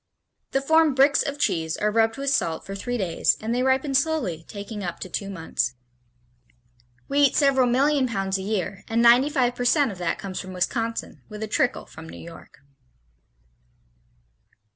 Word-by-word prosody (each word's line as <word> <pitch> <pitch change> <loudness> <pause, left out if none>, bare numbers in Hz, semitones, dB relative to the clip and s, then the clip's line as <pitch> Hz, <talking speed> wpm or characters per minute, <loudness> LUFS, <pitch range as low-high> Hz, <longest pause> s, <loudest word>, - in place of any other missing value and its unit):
The 270 - 0
formed 320 -1 +4
"bricks" 275 +2 +4
of 280 0 -3
cheese 160 - -1
are 210 0 0
rubbed 225 +1 +2
with 275 0 -1
salt 165 -11 -1
for 195 - -7
three 245 +5 -3
days 185 -6 +1
and 220 +2 -3
they 245 - 0
ripen 265 +2 +1
slowly, 270 - 0
taking 205 0 -7
up 175 -2 -5
to 185 - -6
two 200 +3 -4
months. 160 -8 -2 1.3
We 280 - 0
eat 285 -2 +4
several 270 -3 +3
million 270 +2 +2
pounds 195 -4 -2
a - - -5
year 195 -1 -3
and 230 +1 +1
95 250 +1 +4
percent 245 +2 +2
of 190 - -10
that 175 -2 -1
comes 190 -2 -6
from 185 0 -7
Wisconsin, 225 +5 -3
with 210 0 -7
a - - -3
trickle 250 +3 0
from 160 +1 -12
New - - -10
York. 165 -4 -13
230 Hz, 170 wpm, -24 LUFS, 190-270 Hz, 1.3 s, formed